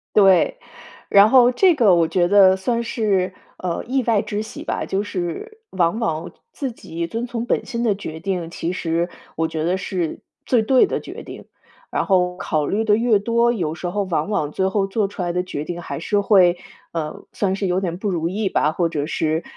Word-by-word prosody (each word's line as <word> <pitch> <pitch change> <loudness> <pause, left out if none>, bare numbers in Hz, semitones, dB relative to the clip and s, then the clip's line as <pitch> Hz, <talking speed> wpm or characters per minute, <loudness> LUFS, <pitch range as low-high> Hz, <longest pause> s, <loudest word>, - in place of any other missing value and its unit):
对， 195 - +5 0.5
然 200 +2 +6
后 250 0 +6
这 355 +7 +4
个 225 -9 +5
我 165 -1 +3
觉 175 +1 +2
得 190 -1 +6
算 235 +5 -1
是， 200 -6 0 0.2
呃， 180 -2 -3
意 260 +1 0
外 225 -3 +2
之 210 0 -3
喜 220 - -8
吧。 - - -2
就 195 +1 -1
是 205 - -5
往 175 +3 +1
往 160 -8 -2 0.2
自 270 - -4
己 170 -7 -6
遵 230 +7 -3
从 235 -1 -4
本 - - 0
心 235 -2 -3
的 225 -3 +3
决 160 -5 -7
定， 180 -2 -3
其 170 0 -3
实 170 0 -1 0.3
我 160 0 0
觉 160 -1 -3
得 180 +3 +1
是 180 -3 -3 0.3
最 240 -4 +2
对 255 +3 +5
的 - - -2
决 - - -9
定， - - -10 0.5
然 - - 0
后 180 -2 +2
考 155 -4 -1
虑 210 +8 0
得 210 -2 +4
越 225 -2 +3
多， 235 +3 +2
有 165 -8 -2
时 175 - -5
候 200 +3 -1
往 165 -2 -1
往 150 -8 -1
最 190 +4 0
后 195 0 0
做 200 +1 0
出 195 - -7
来 175 -1 -1
的 180 +1 -1
决 150 -5 -5
定 175 +2 -5
还 - - -5
是 205 +5 0
会， 185 -4 +4 0.3
呃， 155 -2 -5
算 190 -2 -1
是 195 0 -2
有 180 +1 +1
点 175 -3 -3
不 205 +2 -2
如 165 -3 -1
意 200 +2 -1
吧， 150 - +1
或 170 +1 0
者 145 -3 -2
是， 160 +1 -1
190 Hz, 230 characters per minute, -21 LUFS, 170-220 Hz, 0.5 s, 然